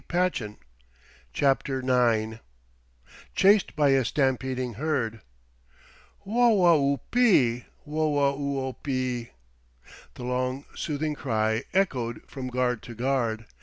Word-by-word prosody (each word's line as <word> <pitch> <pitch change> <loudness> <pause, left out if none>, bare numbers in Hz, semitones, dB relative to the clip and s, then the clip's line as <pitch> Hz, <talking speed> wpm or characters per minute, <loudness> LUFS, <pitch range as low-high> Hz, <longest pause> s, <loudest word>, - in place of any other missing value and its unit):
cried 180 +1 +2
Tad. 105 -2 -6 0.7
CHAPTER 135 - +1 0.3
IX 110 0 -3 1.0
CHASED 200 +1 +4
BY 145 -2 +3
A 135 -1 +4
STAMPEDING 130 -1 -1
HERD 115 -4 -2 1.0
"Whoa 210 -6 +4
oo 140 -1 +2
ope! 135 - -16 0.7
Whoa 150 -2 +1
oo 140 -1 -2
ope!" 130 - -7
The 130 -3 -2 1.0
long 130 +2 -2
soothing 155 0 -2
cry 110 -3 -1
echoed 125 - 0
from 130 -2 -6
guard 125 -2 -1
to 120 - -10
guard. 120 -3 -1
130 Hz, 105 wpm, -26 LUFS, 120-150 Hz, 1.0 s, CHASED